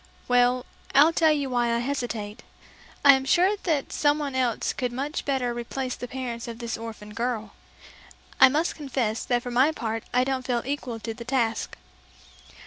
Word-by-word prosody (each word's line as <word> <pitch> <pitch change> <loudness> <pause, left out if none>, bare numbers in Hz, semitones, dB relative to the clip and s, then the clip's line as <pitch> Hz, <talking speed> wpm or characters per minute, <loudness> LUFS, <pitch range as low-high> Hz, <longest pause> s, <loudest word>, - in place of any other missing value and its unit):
"Well, 245 0 +3 0.3
I'll 300 +4 +7
tell 320 -1 +4
you 285 -3 -1
why 240 -1 +1
I 235 - +2
hesitate. 235 -5 -3 0.6
I'm 270 -2 +7
sure 360 +8 +3
that 305 -6 -1
someone 290 -1 +1
else 250 -3 0
could 250 -1 -2
much 275 +5 -3
better 260 -4 0
replace 250 +2 -4
the 245 - -7
parents 245 -2 -5
of 230 -1 -6
this 235 -1 -4
orphaned 220 -2 -8
girl. 230 -2 -3 0.9
I 265 - +9
must 310 +5 0
confess 255 -7 -2
that 240 -1 0
for 245 - -5
my 260 +6 +4
part 225 -6 -3
I 250 +1 +3
don't 265 0 -1
feel 240 -2 0
equal 255 -4 -4
to 225 - -4
the 235 +1 -9
task." 230 -4 -1
250 Hz, 170 wpm, -26 LUFS, 235-275 Hz, 0.9 s, I